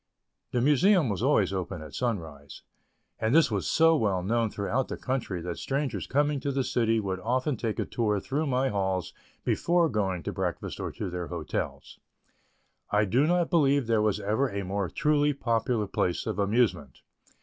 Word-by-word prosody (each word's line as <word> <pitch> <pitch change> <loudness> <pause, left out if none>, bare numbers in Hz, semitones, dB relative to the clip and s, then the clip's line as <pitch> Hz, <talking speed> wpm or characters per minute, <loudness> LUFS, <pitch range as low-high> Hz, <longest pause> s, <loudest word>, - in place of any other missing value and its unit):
The 120 - 0
Museum 150 - +4
was 100 -1 -2
always 110 -8 +2
open 95 -3 -4
at 75 -2 -11
sunrise, 80 - -4 0.6
and 110 +5 +1
this 165 - +5
was - - -1
so 165 0 +4
well 100 - 0
known 115 +3 +1
throughout 115 +6 -1
the - - -5
country 125 -9 -3
that 85 0 -5
strangers 140 0 -2
coming 145 +1 +1
to 140 +2 -2
the 135 -1 0
city 115 -2 +1
would 95 -3 -3
often 130 +7 0
take 110 -1 -3
a - - -1
tour 105 -4 0
through 145 +9 -2
my 130 0 +1
halls 95 -3 -1 0.3
before 170 -1 +2
going 95 - -1
to - - -4
breakfast - - -3
or - - -3
to - - -5
their 90 -1 -4
hotels. 85 -4 -5 0.9
I 105 +1 +3
do 125 +10 +2
not 175 0 +1
believe 140 -5 +3
there 110 -1 +2
was 105 -1 +1
ever 110 +7 0
a 100 0 -3
more 95 -1 -2
truly 150 -1 +2
popular 115 -3 0
place 90 -2 -1
of - - -3
amusement. 100 - 0
115 Hz, 180 wpm, -28 LUFS, 95-140 Hz, 0.9 s, this